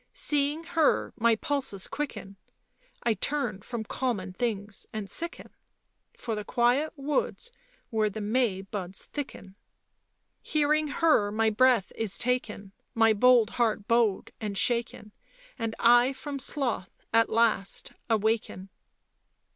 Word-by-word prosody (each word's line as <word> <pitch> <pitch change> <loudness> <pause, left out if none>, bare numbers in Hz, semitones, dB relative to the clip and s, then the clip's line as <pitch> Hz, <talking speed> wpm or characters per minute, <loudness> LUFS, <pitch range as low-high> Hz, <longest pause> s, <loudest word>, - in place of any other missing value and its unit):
" - - -48 0.2
Seeing 295 +2 +1
her 330 -2 +1
my 235 -1 +3
pulses 260 -8 -2
quicken, 230 -9 -5 0.7
I 235 - +3
turn 240 -6 -2
from 235 +2 -5
common 210 -6 -3
things 205 -2 -3
and 215 -2 -5
sicken, 335 - -4 0.7
For 235 -2 -4
the 210 -1 -3
quiet 245 +8 +1
woods 300 +11 -2 0.4
where 215 -2 +2
the 210 - -6
May 210 -2 0
buds 195 -2 -6
thicken. 265 -9 -7 0.5
" - - -50 0.3
Hearing 305 0 +1
her 290 -9 +2
my 220 +1 +2
breath 235 -2 +3
is 220 -4 -3
taken, 220 -5 -2 0.2
My 225 -1 +5
bold 235 0 +5
heart 215 -3 +1
bowed 230 -4 +2
and 205 -2 -3
shaken, 235 -2 -1 0.5
And 225 -1 -2
I 240 +3 +5
from 280 +1 -6
sloth 260 -8 -2 0.2
at 230 0 +4
last 220 -4 +1 0.2
awaken." 220 -3 0
230 Hz, 130 wpm, -28 LUFS, 210-265 Hz, 0.7 s, My